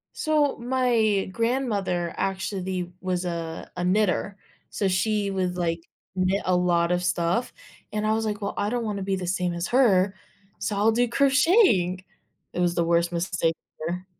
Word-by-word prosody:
So, 300 Hz, -2 st, +1 dB
my 235 Hz, -5 st, +1 dB
grandmother 215 Hz, -8 st, -1 dB
actually 190 Hz, -2 st, -2 dB
was 185 Hz, -1 st, -2 dB
a 165 Hz, -2 st, -5 dB
a 180 Hz, -, -3 dB
knitter, 195 Hz, +1 st, +1 dB, 0.3 s
so 200 Hz, -, -1 dB
she 200 Hz, +1 st, 0 dB
would, 185 Hz, -2 st, -1 dB
like, 165 Hz, -1 st, -1 dB, 0.3 s
knit 185 Hz, +2 st, +1 dB
a 185 Hz, -, +2 dB
lot 175 Hz, -1 st, +2 dB
of 180 Hz, 0 st, +1 dB
stuff, 180 Hz, +5 st, 0 dB, 0.4 s
and 215 Hz, 0 st, -2 dB
I 215 Hz, -, +2 dB
was 225 Hz, 0 st, 0 dB
like, 210 Hz, -1 st, -2 dB
"Well, 200 Hz, -1 st, -3 dB
I 205 Hz, -, -1 dB
don't 240 Hz, +1 st, -1 dB
wanna 205 Hz, -2 st, -3 dB
be 195 Hz, 0 st, -1 dB
the 185 Hz, -, -4 dB
same 180 Hz, -1 st, -1 dB
as 170 Hz, +1 st, -2 dB
her, 200 Hz, -7 st, +4 dB, 0.5 s
so 200 Hz, +2 st, -2 dB
I'll 215 Hz, +3 st, +4 dB
do 245 Hz, +2 st, +2 dB
crocheting." 270 Hz, -, +3 dB, 0.5 s
It -, -, -4 dB
was 175 Hz, -1 st, +1 dB
the 170 Hz, -, +2 dB
worst 170 Hz, 0 st, +2 dB
mistake 170 Hz, -1 st, 0 dB, 0.3 s
ever. 180 Hz, +2 st, -4 dB
190 Hz, 170 wpm, -25 LUFS, 180-220 Hz, 0.5 s, her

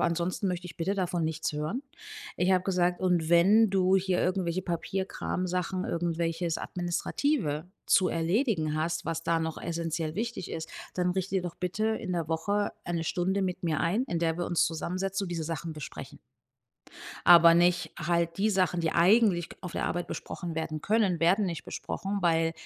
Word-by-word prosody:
Aber -, -, +2 dB
ansonsten 170 Hz, +3 st, -1 dB
möchte 180 Hz, -1 st, -2 dB
ich 170 Hz, -, -11 dB
bitte 180 Hz, +4 st, -1 dB
davon 180 Hz, -3 st, -1 dB
nichts 160 Hz, 0 st, -2 dB
hören. 155 Hz, -, -3 dB, 0.5 s
Ich 180 Hz, +1 st, +2 dB
habe 185 Hz, -1 st, +3 dB
gesagt: 180 Hz, -2 st, +1 dB
„Und 175 Hz, -3 st, +1 dB
wenn 200 Hz, +6 st, +6 dB
du 190 Hz, -1 st, +3 dB
hier 185 Hz, -1 st, +1 dB
irgendwelche 185 Hz, -1 st, 0 dB
Papierkramsachen, 185 Hz, 0 st, -2 dB
irgendwelches 170 Hz, 0 st, -1 dB
Administrative 175 Hz, -, -1 dB, 0.2 s
zu 185 Hz, -2 st, +4 dB
erledigen 165 Hz, -, 0 dB
hast, 160 Hz, +2 st, -1 dB
was 165 Hz, 0 st, -3 dB
da 165 Hz, 0 st, +1 dB
noch 160 Hz, -1 st, -3 dB
essenziell 165 Hz, -1 st, -3 dB
wichtig 230 Hz, -3 st, -4 dB
ist, 160 Hz, 0 st, -5 dB, 0.2 s
dann 180 Hz, 0 st, +1 dB
richte 190 Hz, +1 st, -2 dB
dir 185 Hz, -, 0 dB
doch 175 Hz, -1 st, -6 dB
bitte 195 Hz, +5 st, -1 dB
in 220 Hz, -4 st, -2 dB
der 170 Hz, -3 st, -1 dB
Woche 200 Hz, +6 st, 0 dB
1 170 Hz, -1 st, -2 dB
Stunde 185 Hz, +4 st, 0 dB
mit 185 Hz, 0 st, -3 dB
mir 160 Hz, -3 st, 0 dB
ein, 195 Hz, +9 st, +1 dB
in 175 Hz, -11 st, -2 dB
der 165 Hz, 0 st, 0 dB
wir 175 Hz, -, -1 dB
uns 175 Hz, -, +2 dB
zusammensetzen 185 Hz, +4 st, -2 dB
und -, -, -6 dB
diese 165 Hz, -2 st, -3 dB
Sachen 165 Hz, 0 st, -4 dB
besprechen.“ 150 Hz, -3 st, -8 dB, 1.1 s
Aber 170 Hz, -1 st, +9 dB
nicht 175 Hz, +1 st, +2 dB
halt 170 Hz, 0 st, 0 dB
die 215 Hz, +2 st, +2 dB
Sachen, 185 Hz, -3 st, +1 dB
die 165 Hz, -1 st, 0 dB
eigentlich 180 Hz, -1 st, +4 dB
k -, -, -11 dB
auf 180 Hz, -3 st, -7 dB
der -, -, -1 dB
Arbeit 175 Hz, +1 st, -2 dB
besprochen 170 Hz, -2 st, -5 dB
werden 155 Hz, -1 st, -3 dB
können, 200 Hz, -4 st, +1 dB
werden 185 Hz, +5 st, +4 dB
nicht 170 Hz, -3 st, -4 dB
besprochen, 200 Hz, +1 st, -4 dB
weil, 165 Hz, -1 st, +3 dB
äh, -, -, -5 dB
175 Hz, 185 wpm, -29 LUFS, 165-190 Hz, 1.1 s, Aber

